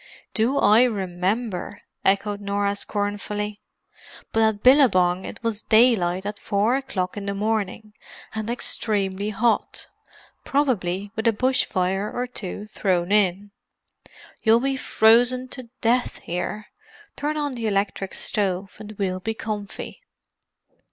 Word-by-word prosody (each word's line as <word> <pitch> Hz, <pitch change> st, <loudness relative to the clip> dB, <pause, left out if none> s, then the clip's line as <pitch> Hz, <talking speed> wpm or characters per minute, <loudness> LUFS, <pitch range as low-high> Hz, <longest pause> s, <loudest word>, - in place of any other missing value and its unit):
"Do 235 Hz, +6 st, +1 dB
I 215 Hz, -1 st, +6 dB
remember!" 200 Hz, 0 st, -2 dB, 0.2 s
echoed 200 Hz, +1 st, +1 dB
Norah 200 Hz, 0 st, 0 dB
scornfully. 205 Hz, +1 st, -3 dB, 0.7 s
"But 225 Hz, -, +2 dB
at 220 Hz, -2 st, +2 dB
Billabong 190 Hz, -10 st, +5 dB
it -, -, -9 dB
was 225 Hz, -2 st, -2 dB
daylight 205 Hz, -6 st, +3 dB
at 205 Hz, 0 st, -4 dB
four 210 Hz, +5 st, +1 dB
o'clock 215 Hz, -10 st, -3 dB
in 200 Hz, -1 st, -5 dB
the 200 Hz, -, -2 dB
morning, 215 Hz, 0 st, -2 dB, 0.4 s
and 220 Hz, 0 st, -4 dB
extremely 205 Hz, -4 st, -1 dB
hot—probably 215 Hz, -2 st, -2 dB
with 220 Hz, +1 st, -1 dB
a -, -, +6 dB
bush 255 Hz, +5 st, +1 dB
fire 190 Hz, +3 st, -1 dB
or 245 Hz, -, -2 dB
two 210 Hz, -4 st, -6 dB
thrown 185 Hz, -4 st, -1 dB
in. 200 Hz, -1 st, +2 dB, 0.9 s
You'll 225 Hz, 0 st, +5 dB
be 270 Hz, +2 st, 0 dB
frozen 245 Hz, +1 st, +4 dB
to 255 Hz, -3 st, -8 dB
death 245 Hz, +2 st, +1 dB
here. 180 Hz, +5 st, -4 dB, 0.5 s
Turn 300 Hz, +1 st, -2 dB
on 290 Hz, -2 st, -1 dB
the 230 Hz, -3 st, -3 dB
electric 195 Hz, -1 st, -1 dB
stove, 195 Hz, -2 st, -2 dB
and 215 Hz, 0 st, -8 dB
we'll 190 Hz, -3 st, -2 dB
be 225 Hz, +4 st, -3 dB
comfy." 210 Hz, -, -6 dB
210 Hz, 125 wpm, -24 LUFS, 195-230 Hz, 0.9 s, I